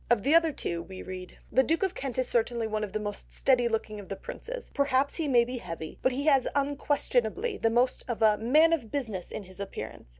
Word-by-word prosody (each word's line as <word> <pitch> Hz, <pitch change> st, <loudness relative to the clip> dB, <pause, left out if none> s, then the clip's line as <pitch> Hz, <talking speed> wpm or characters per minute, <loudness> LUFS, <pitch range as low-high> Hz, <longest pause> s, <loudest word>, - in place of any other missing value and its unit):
Of 235 Hz, -4 st, +3 dB
the 280 Hz, +4 st, +3 dB
other 330 Hz, -1 st, +5 dB
two 170 Hz, -, -3 dB
we 185 Hz, +2 st, -9 dB
read:— 185 Hz, -1 st, -8 dB
"The 260 Hz, -, +5 dB
duke 325 Hz, +7 st, +1 dB
of 380 Hz, -1 st, +1 dB
Kent 270 Hz, -6 st, -5 dB
is 255 Hz, -1 st, +1 dB
certainly 235 Hz, 0 st, 0 dB
one 215 Hz, -1 st, -2 dB
of 205 Hz, -, -4 dB
the 215 Hz, -, -2 dB
most 205 Hz, -1 st, -6 dB
steady 250 Hz, -3 st, +3 dB
looking 220 Hz, -2 st, -2 dB
of 200 Hz, -, -11 dB
the 195 Hz, -, -3 dB
princes, -, -, -8 dB
perhaps 280 Hz, -1 st, +2 dB
he 325 Hz, -3 st, -2 dB
may 240 Hz, -3 st, +5 dB
be 250 Hz, +1 st, -5 dB
heavy, 165 Hz, -5 st, -7 dB
but 260 Hz, -, +3 dB
he 275 Hz, +3 st, -2 dB
has 275 Hz, -4 st, +4 dB
unquestionably 285 Hz, -, 0 dB
the 225 Hz, -, +3 dB
most 245 Hz, +2 st, +2 dB
of 235 Hz, -2 st, -2 dB
a 215 Hz, -1 st, +6 dB
Man 305 Hz, +8 st, +5 dB
of 270 Hz, -9 st, -1 dB
Business 220 Hz, -11 st, -3 dB
in -, -, -6 dB
his 185 Hz, 0 st, -14 dB
Appearance." 200 Hz, -, -7 dB
245 Hz, 235 wpm, -29 LUFS, 215-280 Hz, -, a